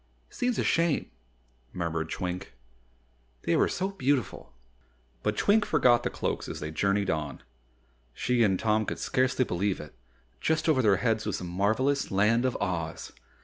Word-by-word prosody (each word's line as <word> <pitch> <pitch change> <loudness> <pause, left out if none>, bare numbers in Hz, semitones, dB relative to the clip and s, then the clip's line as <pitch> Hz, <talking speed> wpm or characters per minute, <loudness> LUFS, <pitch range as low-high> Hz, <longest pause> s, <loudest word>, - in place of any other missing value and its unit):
"Seems 245 -1 -1
a - - +1
shame," 165 -3 +1 0.6
murmured 80 -2 -2
Twink, 90 +2 -4 0.9
"they - - +1
were - - +4
so 190 +2 -2
beautiful." 140 - -1 0.7
But 105 0 -1
Twink 210 +1 +4
forgot 125 -9 +4
the - - -1
Cloaks - - -3
as - - -5
they 75 - -5
journeyed 100 +3 +1
on. 75 -3 -4 0.7
She 125 - 0
and 95 -4 +3
Tom 110 -1 +1
could - - -3
scarcely 130 0 +1
believe 95 +1 -1
it 75 - -10 0.5
just 160 0 0
over 150 -5 +4
their 105 -5 +4
heads 110 -1 0
was 105 - -1
the - - -7
marvelous 110 +11 0
Land 105 +5 +3
of 130 - 0
Oz. 85 -2 -3
110 Hz, 155 wpm, -28 LUFS, 90-130 Hz, 0.9 s, were